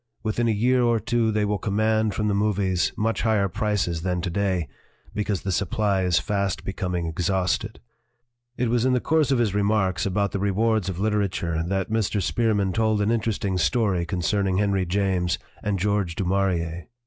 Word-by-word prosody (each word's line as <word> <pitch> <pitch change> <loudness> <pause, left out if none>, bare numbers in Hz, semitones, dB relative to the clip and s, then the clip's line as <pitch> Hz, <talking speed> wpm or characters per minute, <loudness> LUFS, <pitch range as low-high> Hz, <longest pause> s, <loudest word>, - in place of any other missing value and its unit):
Within 115 +2 0
a - - +3
year 125 +4 +2
or 120 -1 +2
two 115 +1 +1
they 105 -1 +1
will 105 -1 -1
command 110 0 +1
from 105 - 0
the 105 - +1
movies 100 -3 +1
much 115 +1 0
higher 110 -3 +2
prices 95 -4 -1
than 90 0 -1
to 90 0 -3
day, 95 -4 0 0.5
because 105 -2 -2
the 95 - -2
supply 100 +1 0
is 90 -1 +2
fast 100 -2 -1
becoming 90 -3 -2
exhausted." 90 +5 -1 0.8
1 125 - 0
It - - -1
was 120 -1 +2
in 130 0 +2
the 125 - +3
course 155 +1 +1
of 135 - +3
his 115 -5 +1
remarks 100 -4 +1
about 100 +1 0
the 100 - -2
rewards 100 0 +1
of 90 - -4
literature 100 -6 0
that 95 +2 -2
Mr. 110 -1 0
Spearman 105 -1 +1
told 110 -2 +1
an 105 +2 +1
interesting 105 -5 -1
story 100 -4 +1
concerning 95 +2 0
Henry 100 -2 +1
James 90 -2 0 0.2
and 100 -1 -1
George 100 -3 0
du 95 - -2
Maurier. 90 -3 -1
100 Hz, 185 wpm, -24 LUFS, 95-110 Hz, 0.8 s, a